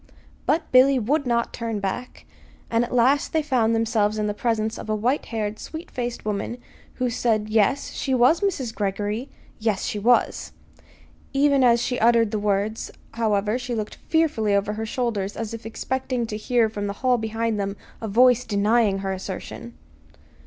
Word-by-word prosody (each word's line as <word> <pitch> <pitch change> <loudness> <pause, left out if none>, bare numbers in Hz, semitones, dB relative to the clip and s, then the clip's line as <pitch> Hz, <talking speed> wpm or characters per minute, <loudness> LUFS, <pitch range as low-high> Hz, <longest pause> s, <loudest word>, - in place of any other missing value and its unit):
But 315 +1 +1
Billy 260 +1 +6
would 275 +4 0
not 235 -1 0
turn 230 -3 -3
back, 200 +6 -5 0.5
and 230 0 +3
at 240 - -5
last 255 +4 +3
they 315 -1 +2
found 240 -6 +2
themselves 220 -2 +1
in 215 - 0
the 210 - -1
presence 220 0 -1
of - - -8
a 215 - +1
white 245 +7 0
haired, 215 -2 -3
sweet 325 +2 -8
faced 240 -2 -4
woman 210 +3 -2 0.4
who 250 - 0
said 220 -3 0
yes, 220 +6 +2
she 265 -2 -1
was 255 +9 +4
Mrs. 285 - -1
Greggory; 205 +5 -2 0.3
yes, 215 -3 0
she 210 - -2
was. 240 +4 +2 0.8
Even 280 -1 +4
as 235 -1 +4
she 250 - -1
uttered 230 -1 +4
the 215 - -1
words, 205 +2 -1 0.2
however, 215 0 0
she 245 -1 -4
looked 215 -1 -5
fearfully 285 -11 +2
over 200 +1 0
her 220 +1 -4
shoulders 215 -5 -2
as 225 -1 -4
if 230 0 -7
expecting 255 +1 -2
to 220 - -5
hear 230 +2 +2
from 205 -2 -4
the 200 - -3
hall 250 -1 +4
behind 225 0 -1
them 200 0 -3 0.2
a 220 - -3
voice 250 +3 +5
denying 210 -1 +2
her 190 - -1
assertion. 175 - -7
225 Hz, 175 wpm, -24 LUFS, 210-250 Hz, 0.8 s, Billy